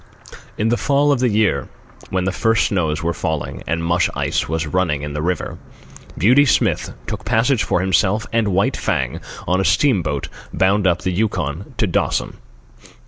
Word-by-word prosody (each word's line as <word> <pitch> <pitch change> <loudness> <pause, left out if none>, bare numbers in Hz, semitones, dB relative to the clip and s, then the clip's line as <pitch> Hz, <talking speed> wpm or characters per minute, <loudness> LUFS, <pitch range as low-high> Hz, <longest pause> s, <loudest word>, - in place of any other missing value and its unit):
In 110 +2 +1
the 120 - +2
fall 145 +1 +3
of 140 - +2
the 125 -1 +2
year, 105 -10 +1 0.4
when 95 -1 -1
the 95 - 0
first 115 +3 +2
snows 80 -6 -1
were 85 +1 0
falling 80 -2 -3
and 85 +1 -1
mush 85 +1 +2
ice - - -1
was 80 0 -1
running 75 -3 0
in 75 0 -5
the 75 - -3
river, 90 +3 -2 0.6
Beauty 125 +9 +5
Smith 140 - +1
took - - -5
passage 115 +2 +2
for 90 - 0
himself 95 +3 +1
and 115 -2 +2
White 100 0 +1
Fang - - -1 0.3
on 90 +1 +2
a - - +1
steamboat 90 - +1 0.2
bound 95 +1 +2
up 90 -1 +1
the 95 - 0
Yukon 90 -4 -2
to - - +2
Dawson. - - -1
95 Hz, 175 wpm, -19 LUFS, 85-110 Hz, 0.6 s, Beauty